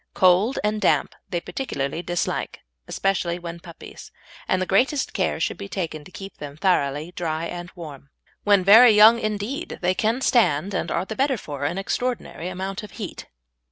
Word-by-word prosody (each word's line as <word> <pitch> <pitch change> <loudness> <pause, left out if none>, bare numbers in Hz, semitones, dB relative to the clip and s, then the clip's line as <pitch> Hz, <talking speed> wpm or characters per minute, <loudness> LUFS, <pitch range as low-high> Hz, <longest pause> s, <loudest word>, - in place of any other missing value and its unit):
Cold 190 +8 +4
and 210 0 0
damp 190 - +2 0.2
they 175 - -1
particularly 160 - -4
dislike, 175 -1 -3 0.3
especially 180 -3 -1
when 170 -1 -7
puppies, 170 -1 -12 0.4
and 185 - +1
the 185 - 0
greatest 260 - +1
care - - -1
should - - -2
be 200 0 -7
taken 165 -6 -4
to 185 - -15
keep 195 +1 -9
them 145 -1 -8
thoroughly 155 -3 0
dry 165 -1 -2
and 175 +1 -6
warm. 145 -5 -10 0.3
When 200 -2 +4
very 220 +4 +8
young 220 +3 +7
indeed 215 +10 -3
they 180 +1 +3
can 225 +6 0
stand, 200 - +2
and - - -2
are 170 - -1
the 220 - -6
better 270 0 +1
for, 145 -7 -6
an 170 +6 -2
extraordinary 195 -4 -3
amount 190 +2 -4
of 210 - -11
heat. 210 -6 -7
185 Hz, 175 wpm, -23 LUFS, 170-215 Hz, 0.4 s, very